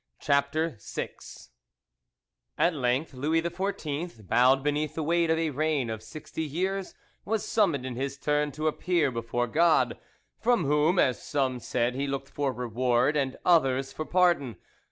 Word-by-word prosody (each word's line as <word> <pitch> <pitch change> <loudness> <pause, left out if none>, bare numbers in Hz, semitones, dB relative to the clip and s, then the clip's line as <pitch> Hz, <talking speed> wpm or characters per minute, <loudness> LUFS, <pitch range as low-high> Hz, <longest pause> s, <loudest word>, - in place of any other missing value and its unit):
CHAPTER 140 -1 0
VI - - -4 1.5
At 170 - +3
length 135 +2 0
Louis 150 +5 +1
XIV, 170 - -4
bowed 130 +6 +4
beneath 150 +1 -1
the 160 - -2
weight 170 +1 +2
of 160 - +3
a 160 -1 0
reign 145 -4 0
of 110 -1 -5
sixty 150 +8 -7
years, 185 +5 -2 0.3
was 215 0 -1
summoned 170 - +1
in 130 -2 -4
his 135 +2 -3
turn 150 +1 0
to 155 +3 -4
appear 155 -2 +1
before 115 +1 -2
God, 160 +6 +2 0.4
from 235 -8 +2
whom, 150 +5 +2
as 125 -9 +2
some 130 -3 -1
said, 120 +1 -1
he 140 +2 -2
looked 135 0 -4
for 140 -2 -1
reward, 125 +3 +1
and 135 -3 -1
others 135 -6 +3
for 155 - -4
pardon. 175 -10 +2
145 Hz, 155 wpm, -28 LUFS, 130-165 Hz, 1.5 s, bowed